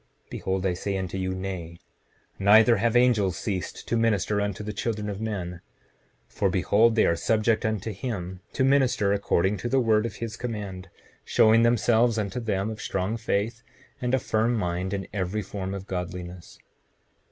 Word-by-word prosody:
Behold 95 Hz, 0 st, -2 dB
I 95 Hz, -, +2 dB
say 95 Hz, +2 st, -3 dB
unto 95 Hz, -1 st, -4 dB
you, 95 Hz, 0 st, -2 dB
Nay; 90 Hz, -3 st, -5 dB, 0.6 s
neither 110 Hz, +4 st, +6 dB
have 115 Hz, +3 st, +1 dB
angels 115 Hz, -7 st, +3 dB
ceased 95 Hz, -4 st, -4 dB
to -, -, 0 dB
minister 105 Hz, -3 st, +1 dB
unto 100 Hz, 0 st, -3 dB
the 105 Hz, 0 st, -4 dB
children 105 Hz, -3 st, -3 dB
of 100 Hz, +1 st, -6 dB
men. 90 Hz, -6 st, -4 dB, 0.7 s
7:30 -, -, -29 dB
For -, -, +2 dB
behold, 110 Hz, +2 st, +3 dB
they 110 Hz, -, +4 dB
are 85 Hz, -, +3 dB
subject 110 Hz, +5 st, +1 dB
unto 110 Hz, 0 st, -2 dB
him, 95 Hz, -4 st, -5 dB
to 130 Hz, -, +1 dB
minister 130 Hz, -7 st, +3 dB
according 100 Hz, 0 st, +1 dB
to 110 Hz, +6 st, -4 dB
the 135 Hz, -, +3 dB
word 110 Hz, -2 st, +2 dB
of -, -, -9 dB
his 115 Hz, -1 st, -5 dB
command, 100 Hz, -6 st, -5 dB, 0.3 s
showing 110 Hz, +1 st, +4 dB
themselves 115 Hz, 0 st, +3 dB
unto 105 Hz, +2 st, -2 dB
them 105 Hz, -2 st, -1 dB
of 110 Hz, -, -7 dB
strong 95 Hz, +3 st, -2 dB
faith 115 Hz, 0 st, -2 dB, 0.4 s
and 125 Hz, +1 st, +1 dB
a -, -, +1 dB
firm 115 Hz, +1 st, +1 dB
mind 90 Hz, -2 st, -2 dB
in 95 Hz, -, -5 dB
every 100 Hz, +1 st, -2 dB
form 95 Hz, 0 st, -5 dB
of 95 Hz, -1 st, -7 dB
godliness. 90 Hz, -1 st, -6 dB
105 Hz, 175 wpm, -26 LUFS, 95-115 Hz, 0.7 s, neither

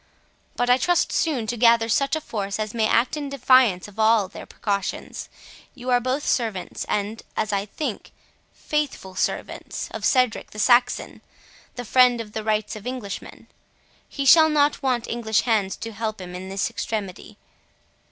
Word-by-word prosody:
But 245 Hz, -, 0 dB
I 250 Hz, +1 st, +4 dB
trust 350 Hz, +2 st, +2 dB
soon 280 Hz, -9 st, 0 dB
to 240 Hz, -, -2 dB
gather 230 Hz, -1 st, +5 dB
such 275 Hz, +6 st, +1 dB
a 315 Hz, -, -3 dB
force, 200 Hz, -7 st, -4 dB
as 215 Hz, -1 st, -3 dB
may 225 Hz, -2 st, +1 dB
act 235 Hz, +7 st, +2 dB
in 290 Hz, -2 st, -4 dB
defiance 255 Hz, -8 st, +3 dB
of 210 Hz, +1 st, -14 dB
all 220 Hz, -2 st, +4 dB
their 190 Hz, -, -11 dB
precautions; 200 Hz, -3 st, -4 dB, 0.5 s
you 250 Hz, 0 st, -4 dB
are 245 Hz, -, +5 dB
both 255 Hz, +4 st, -2 dB
servants, 220 Hz, -7 st, -2 dB
and, 210 Hz, +2 st, -2 dB, 0.2 s
as 215 Hz, -1 st, -1 dB
I 200 Hz, +1 st, -1 dB
think, 250 Hz, 0 st, -5 dB, 0.4 s
faithful 295 Hz, -11 st, -3 dB
servants, -, -, -3 dB
of -, -, -7 dB
Cedric 250 Hz, -4 st, +2 dB
the -, -, -13 dB
Saxon, 245 Hz, +3 st, +2 dB, 0.5 s
the 245 Hz, -, -6 dB
friend 250 Hz, +1 st, +4 dB
of 220 Hz, -2 st, -6 dB
the 220 Hz, 0 st, -4 dB
rights 215 Hz, 0 st, -1 dB
of 215 Hz, +2 st, -8 dB
Englishmen. 250 Hz, -6 st, -6 dB, 0.6 s
He 275 Hz, -, -4 dB
shall 315 Hz, +3 st, +7 dB
not 295 Hz, -1 st, +2 dB
want 255 Hz, -4 st, 0 dB
English 220 Hz, -2 st, 0 dB
hands 210 Hz, -5 st, 0 dB
to 225 Hz, -, -7 dB
help 220 Hz, -1 st, -4 dB
him 180 Hz, -1 st, -8 dB
in 185 Hz, +1 st, -7 dB
this 195 Hz, +3 st, -2 dB
extremity. 210 Hz, -2 st, -5 dB
230 Hz, 170 wpm, -23 LUFS, 210-255 Hz, 0.6 s, shall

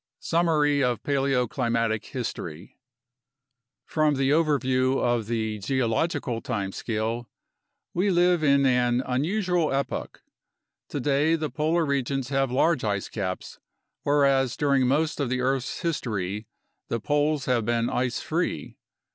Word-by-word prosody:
Summary 150 Hz, -4 st, +2 dB
of 125 Hz, -3 st, 0 dB
Paleoclimatic 125 Hz, -5 st, 0 dB
History 95 Hz, -, -6 dB, 1.1 s
From 155 Hz, -2 st, +1 dB
the 135 Hz, 0 st, +1 dB
overview 135 Hz, -4 st, +2 dB
of 120 Hz, -3 st, 0 dB
the 110 Hz, -2 st, -2 dB
geological 125 Hz, -, -1 dB
time 105 Hz, -6 st, -3 dB
scale, 115 Hz, +3 st, -3 dB, 0.6 s
we 185 Hz, +4 st, +1 dB
live 175 Hz, -2 st, +3 dB
in 140 Hz, -1 st, +4 dB
an 125 Hz, -1 st, +2 dB
unusual 175 Hz, +5 st, 0 dB
epoch: 135 Hz, +1 st, -3 dB, 0.7 s
today 145 Hz, +3 st, +1 dB
the 155 Hz, -2 st, -3 dB
polar 160 Hz, +2 st, +1 dB
regions 135 Hz, -2 st, -1 dB
have 135 Hz, -1 st, +1 dB
large 135 Hz, +3 st, +2 dB
ice 100 Hz, -2 st, -1 dB
caps, 95 Hz, -4 st, -5 dB, 0.4 s
whereas 140 Hz, -3 st, +2 dB
during 140 Hz, -3 st, +2 dB
most 150 Hz, +4 st, +1 dB
of 140 Hz, -4 st, 0 dB
the 125 Hz, 0 st, -1 dB
earth's 130 Hz, 0 st, -1 dB
history 105 Hz, -, -2 dB, 0.4 s
the 115 Hz, -, -2 dB
poles 145 Hz, +3 st, +1 dB
have 125 Hz, -3 st, +1 dB
been 120 Hz, +1 st, +1 dB
ice 125 Hz, -1 st, -1 dB
free. -, -, -2 dB
135 Hz, 120 wpm, -26 LUFS, 120-150 Hz, 1.1 s, in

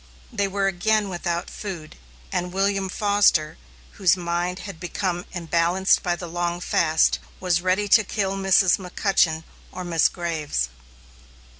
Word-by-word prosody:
They 200 Hz, -3 st, 0 dB
were 195 Hz, 0 st, -1 dB
again 205 Hz, +2 st, +1 dB
without 175 Hz, -1 st, -3 dB
food; 175 Hz, -7 st, -7 dB, 0.4 s
and 180 Hz, 0 st, -2 dB
William 195 Hz, 0 st, 0 dB
Foster, 200 Hz, -7 st, +2 dB, 0.3 s
whose 190 Hz, -2 st, +2 dB
mind 175 Hz, +1 st, -2 dB
had 195 Hz, -5 st, -8 dB
become 175 Hz, 0 st, -3 dB
unbalanced 170 Hz, +2 st, +2 dB
by 175 Hz, -2 st, 0 dB
the 175 Hz, -, -7 dB
long 175 Hz, 0 st, -2 dB
fast, 160 Hz, -2 st, +2 dB, 0.2 s
was 175 Hz, -2 st, +1 dB
ready 185 Hz, +3 st, +1 dB
to 215 Hz, +2 st, +6 dB
kill 195 Hz, -1 st, -2 dB
Mrs. 195 Hz, -1 st, +4 dB
McCutchen 180 Hz, -3 st, +1 dB, 0.3 s
or 185 Hz, -, -6 dB
Miss 170 Hz, -2 st, +3 dB
Graves. 155 Hz, -, -2 dB
180 Hz, 135 wpm, -23 LUFS, 170-195 Hz, 0.4 s, to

